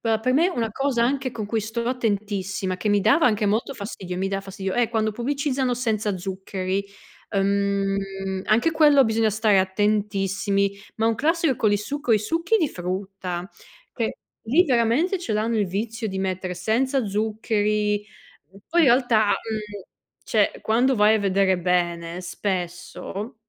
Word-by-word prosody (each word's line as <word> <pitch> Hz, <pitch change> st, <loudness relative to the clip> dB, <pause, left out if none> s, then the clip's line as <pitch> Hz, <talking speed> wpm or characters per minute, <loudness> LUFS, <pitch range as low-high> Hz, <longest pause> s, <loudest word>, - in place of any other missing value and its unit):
Però 225 Hz, -1 st, 0 dB
per 255 Hz, +3 st, +1 dB
me 310 Hz, +6 st, +4 dB
è -, -, +1 dB
una 235 Hz, -11 st, -2 dB
cosa 265 Hz, +1 st, 0 dB
anche 265 Hz, +1 st, 0 dB
con 220 Hz, -3 st, -5 dB
cui 220 Hz, +1 st, -1 dB
sto 225 Hz, +3 st, -3 dB
attentissima 200 Hz, -5 st, -2 dB
che 185 Hz, +4 st, -2 dB
mi 205 Hz, 0 st, +3 dB
dava 325 Hz, -, +4 dB
anche 215 Hz, -2 st, +2 dB
molto 220 Hz, +7 st, 0 dB
fastidio, 200 Hz, -5 st, -6 dB
mi 190 Hz, +1 st, -1 dB
dà 195 Hz, 0 st, -2 dB
fastidio, 195 Hz, -1 st, -5 dB
è 240 Hz, -2 st, +2 dB
quando 220 Hz, -2 st, 0 dB
pubblicizzano 260 Hz, +1 st, -1 dB
senza 220 Hz, -4 st, -1 dB
zuccheri. 190 Hz, +1 st, -3 dB, 0.5 s
Ehm, 195 Hz, -1 st, -1 dB
anche 235 Hz, +9 st, +3 dB
quello 300 Hz, -4 st, +5 dB
bisogna 220 Hz, -1 st, +2 dB
stare 215 Hz, -1 st, +3 dB
attentissimi, 200 Hz, 0 st, 0 dB, 0.2 s
ma 225 Hz, -, +1 dB
un 225 Hz, -, +2 dB
classico 315 Hz, 0 st, +1 dB
con 215 Hz, -2 st, +2 dB
il 205 Hz, -, +2 dB
succo 280 Hz, +4 st, -2 dB
i 215 Hz, -, +5 dB
succhi 330 Hz, -, 0 dB
di 320 Hz, -6 st, +1 dB
frutta, 185 Hz, -1 st, -5 dB, 0.4 s
che 230 Hz, -3 st, -3 dB, 0.2 s
lì 285 Hz, +11 st, +3 dB
veramente 260 Hz, -, +2 dB
ce 340 Hz, -11 st, -4 dB
l'hanno 220 Hz, +2 st, 0 dB
il 205 Hz, -, +1 dB
vizio 220 Hz, +5 st, -3 dB
di 190 Hz, -1 st, -4 dB
mettere 185 Hz, -1 st, -2 dB
"senza 240 Hz, +8 st, 0 dB
zuccheri". 210 Hz, 0 st, 0 dB
E 200 Hz, -1 st, -21 dB
poi 340 Hz, +1 st, +3 dB
in -, -, +5 dB
realtà, 240 Hz, -3 st, +4 dB
uhm, 210 Hz, -2 st, -3 dB, 0.4 s
cioè, 210 Hz, -3 st, +1 dB
quando 245 Hz, +4 st, +2 dB
vai 210 Hz, -1 st, +5 dB
a -, -, 0 dB
vedere 195 Hz, -2 st, +2 dB
bene, 175 Hz, -1 st, -1 dB
spesso 185 Hz, +4 st, -4 dB
210 Hz, 165 wpm, -24 LUFS, 195-235 Hz, 0.5 s, quello